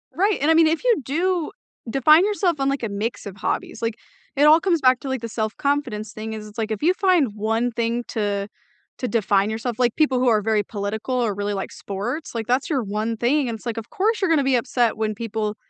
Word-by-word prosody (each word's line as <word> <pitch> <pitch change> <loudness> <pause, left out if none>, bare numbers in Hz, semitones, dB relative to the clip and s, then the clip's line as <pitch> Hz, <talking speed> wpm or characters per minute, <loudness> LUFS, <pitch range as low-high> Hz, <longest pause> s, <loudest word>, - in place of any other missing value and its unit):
Right, 400 +3 +2
and 295 - +2
I - - +6
mean, 325 0 +5
if 320 +6 0
you 475 -9 +3
do 340 - -1 0.4
define 305 - +5
yourself 385 -6 0
on, 270 0 +1
like, 275 -2 -2
a 230 - -1
mix 215 +4 -4
of 200 -1 -8
hobbies, 220 - -3
like, 230 -1 -1 0.4
it 285 - +3
all 310 +2 +7
comes 340 -3 +1
back 255 -1 +4
to, - - -6
like, 265 -2 -2
the 230 - -5
self 220 0 -3
confidence 250 -7 -1
thing 220 0 -6
is 215 -1 -7
it's, 210 +2 -15
like, 220 -1 -2
if 215 - -3
you 345 +4 +4
find 355 - +2
1 225 +3 0
thing 235 +1 -1
to 205 -2 -2 0.5
to 250 - -2
define 205 -3 +2
yourself 225 +2 -4
like, 240 -2 +2
people 280 -5 +2
who 255 - +2
are 220 -3 +4
very 215 0 +1
political 210 +5 -4
or 235 -4 +1
really 205 +1 -2
like 195 - -4
sports, 235 +9 -5
like, 225 -1 -3
that's 250 +2 +1
your 275 -6 0
one 215 +2 -2
thing, 265 +4 +1
and 230 - -3
it's, 215 - -19
like, 235 -1 -3
of 225 - -6
course 435 +3 0
you're 380 - +1
gonna 315 -4 +3
be 265 -1 +2
upset 240 -2 0
when 215 -1 -1
people 215 -1 -3
235 Hz, 245 wpm, -22 LUFS, 215-290 Hz, 0.5 s, all